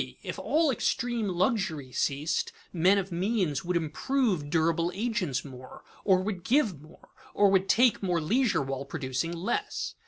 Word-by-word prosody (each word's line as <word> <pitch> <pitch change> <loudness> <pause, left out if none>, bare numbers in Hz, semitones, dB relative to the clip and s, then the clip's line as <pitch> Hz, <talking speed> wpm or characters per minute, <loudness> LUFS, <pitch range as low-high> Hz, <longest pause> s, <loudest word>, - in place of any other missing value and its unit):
_If - - -5
all 315 -1 +2
extreme 240 -2 -1
luxury 180 - -1
ceased, 140 +5 -1 0.2
men 185 +3 +4
of 195 -1 -2
means 180 - 0
would 175 0 0
improve 175 - -1
durable 165 +1 +1
agents 200 - -1
more 130 -2 -11 0.2
or 185 -2 +3
would 190 -3 -4
give 220 - +1
more 155 - -18 0.3
or 200 -1 +5
would 190 0 +2
take 240 +4 +4
more 180 -4 0
leisure 215 - +1
while 135 0 -4
producing 140 +1 -3
less. 175 +7 -3
180 Hz, 150 wpm, -28 LUFS, 155-215 Hz, 0.3 s, or